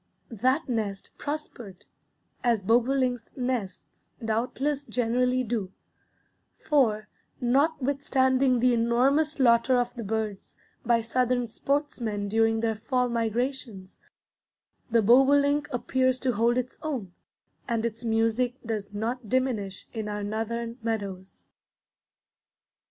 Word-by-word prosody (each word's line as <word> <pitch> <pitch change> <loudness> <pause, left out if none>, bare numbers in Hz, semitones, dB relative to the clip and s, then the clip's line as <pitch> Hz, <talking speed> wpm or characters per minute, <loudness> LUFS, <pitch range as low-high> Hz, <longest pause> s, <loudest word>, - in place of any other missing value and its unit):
That 255 +8 +1
nest 215 -5 -3
prospered, 245 -10 -6 0.6
as 230 -5 +2
bobolinks' 245 +2 +1
nests 245 -6 -4 0.2
doubtless 255 +6 -1
generally 250 +1 +1
do; 215 -5 -3 0.9
for, 220 -8 +1 0.3
notwithstanding 265 -1 +2
the 250 0 +4
enormous 255 +7 +2
slaughter 240 -1 +4
of 245 0 0
the 235 - -6
birds 215 -1 -4 0.3
by 235 -1 +3
Southern 245 +1 0
sportsmen 230 -6 -2
during 225 +1 +2
their 225 -1 +1
fall 250 +3 -1
migrations, 230 -3 -3 0.9
the 230 -1 +3
bobolink 285 +5 +4
appears 255 0 +1
to 260 - +1
hold 235 +2 +2
its 255 0 -3
own, 250 - -4 0.5
and 230 -2 -1
its 230 +1 -4
music 230 +2 +1
does 210 -2 -4
not 230 +1 -3
diminish 235 -7 -1
in 220 -2 -4
our 210 0 -3
Northern 230 +3 -3
meadows. 200 -4 -4
235 Hz, 105 wpm, -27 LUFS, 220-260 Hz, 0.9 s, the